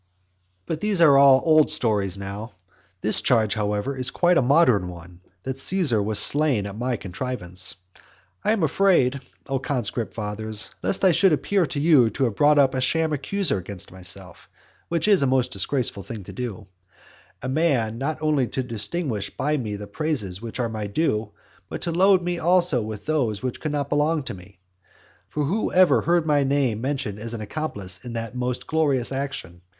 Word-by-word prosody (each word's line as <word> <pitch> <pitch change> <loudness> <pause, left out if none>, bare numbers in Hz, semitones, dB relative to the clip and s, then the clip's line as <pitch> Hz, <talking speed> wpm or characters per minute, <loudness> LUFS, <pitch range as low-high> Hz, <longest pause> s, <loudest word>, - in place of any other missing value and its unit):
XI. - - -45 0.6
But 155 - -4
these 210 -3 +1
are 155 -5 +7
all 135 -1 +6
old 155 -2 +5
stories 105 - 0
now. 100 +3 -7 0.5
This 110 - +3
charge, 110 -4 +2
however, 105 +4 -2
is 130 -1 0
quite 175 0 +3
a - - +3
modern 125 - +3
one, 90 0 -12 0.2
that 130 +1 -4
Caesar 150 - +2
was 105 +1 0
slain 140 0 +2
by 100 - -5
my 120 +5 -2
contrivance. 95 -3 -4 0.7
I - - +2
am 220 -6 +1
afraid, 145 -5 +2 0.2
O 135 -1 -2
conscript 120 -4 -3
fathers, 110 0 -4
lest 195 - +1
I 185 - +6
should 180 +3 +4
appear 170 +5 +1
to 140 - -4
you 145 -6 +5
to 135 - -2
have 120 -5 +1
brought 150 +3 +4
up 135 -2 +4
a 130 - -1
sham 160 +4 +1
accuser 175 - 0
against 90 0 -8
myself 90 -1 -9 0.4
(which 170 +2 0
is 200 -5 +5
a 140 - +2
most 130 -1 +1
disgraceful 125 -8 -1
thing 105 +1 -8
to - - -10
do); 115 -4 -6 0.8
a - - -3
man 130 -6 0
not 150 +3 -2
only 150 -5 +2
to 130 - -3
distinguish 115 - -3
me - - -24
by 150 +2 0
the 105 -6 -4
praises 110 - -2
which 115 +1 -7
are 120 - 0
my 110 -2 -4
due, 105 -2 -1 0.4
but - - -6
to 170 - -1
load 185 +2 +4
me 175 0 -2
also 175 -6 +3
with 105 -1 -7
those 130 -9 -1
which 130 -2 -3
do 155 - -3
not 145 -1 -2
belong 150 +1 +1
to - - -6
me. 95 0 -14 0.7
For 150 +8 -2
who 195 +10 -1
ever 185 0 +5
heard 170 -1 +1
my 145 -2 +2
name 135 -5 0
mentioned 130 -6 -3
as 115 +2 -4
an 110 - -6
accomplice 105 -7 -5
in 120 - -7
that 115 0 -4
most 125 0 -3
glorious 145 -6 0
action? 135 -11 -5
130 Hz, 190 wpm, -23 LUFS, 105-155 Hz, 0.8 s, are